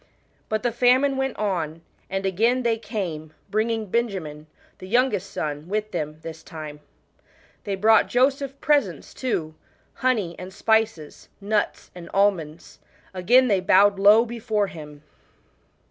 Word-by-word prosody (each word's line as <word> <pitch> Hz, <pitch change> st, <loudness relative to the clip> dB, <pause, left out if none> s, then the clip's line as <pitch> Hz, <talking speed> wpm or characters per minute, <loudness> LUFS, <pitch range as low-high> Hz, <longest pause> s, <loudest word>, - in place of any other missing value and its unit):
But 215 Hz, +1 st, -1 dB
the 240 Hz, -, +1 dB
famine 255 Hz, +4 st, +3 dB
went 265 Hz, 0 st, -2 dB
on, 165 Hz, -6 st, -2 dB, 0.3 s
and 195 Hz, 0 st, -3 dB
again 230 Hz, +7 st, +1 dB
they 230 Hz, -1 st, +1 dB
came, 165 Hz, -9 st, -5 dB, 0.2 s
bringing 220 Hz, +1 st, 0 dB
Benjamin, 185 Hz, -9 st, -3 dB, 0.3 s
the 185 Hz, -, -9 dB
youngest 225 Hz, -3 st, +1 dB
son, 150 Hz, +1 st, -4 dB
with 215 Hz, +1 st, -2 dB
them 150 Hz, -4 st, -4 dB
this 160 Hz, -1 st, -8 dB
time. 155 Hz, -3 st, -9 dB, 0.9 s
They 200 Hz, -2 st, -2 dB
brought 215 Hz, +2 st, +4 dB
Joseph 270 Hz, +2 st, +1 dB
presents 235 Hz, -, 0 dB
too 170 Hz, -12 st, -3 dB, 0.4 s
honey 215 Hz, -10 st, 0 dB
and 185 Hz, +1 st, -8 dB
spices, 220 Hz, -8 st, -1 dB
nuts 210 Hz, +1 st, -2 dB
and 175 Hz, -1 st, -10 dB
almonds. 175 Hz, -6 st, 0 dB, 0.3 s
Again 245 Hz, +8 st, +4 dB
they 200 Hz, -5 st, +2 dB
bowed 195 Hz, +2 st, +4 dB
low 210 Hz, +4 st, +6 dB
before 225 Hz, -3 st, -1 dB
him. 150 Hz, -5 st, -10 dB
205 Hz, 130 wpm, -24 LUFS, 170-235 Hz, 0.9 s, low